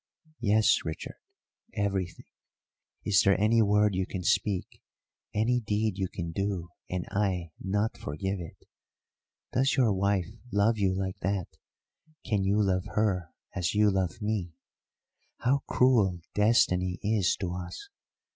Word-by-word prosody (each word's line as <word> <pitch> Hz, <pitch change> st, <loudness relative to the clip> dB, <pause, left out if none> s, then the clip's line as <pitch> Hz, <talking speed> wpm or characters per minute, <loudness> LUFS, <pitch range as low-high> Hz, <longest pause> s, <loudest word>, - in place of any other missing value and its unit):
"Yes, 110 Hz, -1 st, +4 dB
Richard; 80 Hz, 0 st, -6 dB, 0.6 s
everything. 95 Hz, -3 st, -2 dB, 0.8 s
Is 95 Hz, -3 st, +4 dB
there 100 Hz, 0 st, +3 dB
any 110 Hz, +2 st, +4 dB
word 105 Hz, 0 st, +3 dB
you 95 Hz, 0 st, -1 dB
can 95 Hz, -2 st, -5 dB
speak, 95 Hz, +2 st, 0 dB, 0.5 s
any 120 Hz, +4 st, +2 dB
deed 105 Hz, -2 st, -1 dB
you 95 Hz, -, 0 dB
can 85 Hz, -2 st, -5 dB
do, 95 Hz, -1 st, -2 dB, 0.2 s
and 90 Hz, -1 st, -2 dB
I 95 Hz, -5 st, -1 dB
not 105 Hz, +4 st, -1 dB
forgive 95 Hz, +6 st, -3 dB
it? 85 Hz, -2 st, -8 dB, 1.0 s
Does 135 Hz, +2 st, +2 dB
your 120 Hz, -6 st, +3 dB
wife 100 Hz, -1 st, +1 dB, 0.3 s
love 105 Hz, +2 st, +2 dB
you 95 Hz, -2 st, +2 dB
like 95 Hz, -1 st, -3 dB
that 95 Hz, -1 st, -1 dB, 0.8 s
can 105 Hz, -3 st, +1 dB
you 100 Hz, +2 st, +2 dB
love 95 Hz, -2 st, +1 dB
her 95 Hz, -6 st, +1 dB, 0.2 s
as 90 Hz, +1 st, -1 dB
you 105 Hz, 0 st, +4 dB
love 95 Hz, +3 st, -1 dB
me? 105 Hz, -6 st, -2 dB, 0.9 s
How 135 Hz, +3 st, +3 dB
cruel 105 Hz, -9 st, +3 dB
destiny 95 Hz, -4 st, +3 dB
is 105 Hz, -3 st, +2 dB
to 90 Hz, -3 st, -3 dB
us! 90 Hz, -, -7 dB
100 Hz, 135 wpm, -29 LUFS, 90-105 Hz, 1.0 s, Yes